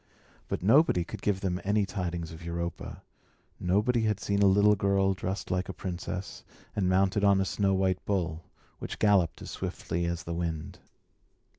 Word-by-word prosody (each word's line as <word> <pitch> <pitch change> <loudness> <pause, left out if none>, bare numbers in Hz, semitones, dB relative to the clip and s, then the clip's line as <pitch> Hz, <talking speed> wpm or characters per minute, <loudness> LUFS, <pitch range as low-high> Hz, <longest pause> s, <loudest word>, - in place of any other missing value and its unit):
But - - -3
nobody 110 - +5
could - - -8
give 100 -2 0
them 90 -2 -1
any 105 +1 +2
tidings 85 -4 -4
of 80 +1 -10
Europa; 85 0 -5 0.6
nobody 105 +7 +2
had 105 -2 0
seen 100 0 0
a 100 - +6
little 100 +2 +5
girl 100 -1 +2
dressed 95 +1 -4
like 90 +1 -1
a - - -3
princess, 90 +1 -5 0.3
and 95 -3 +1
mounted 95 +2 +2
on 100 -1 +5
a 95 - +1
snow 95 0 +1
white 95 -1 0
bull, 85 -5 -1 0.4
which - - -6
galloped 100 -6 +2
as - - -7
swiftly 85 +1 -3
as 85 0 -2
the 85 - -4
wind. 85 -2 -4
95 Hz, 170 wpm, -29 LUFS, 85-100 Hz, 0.6 s, a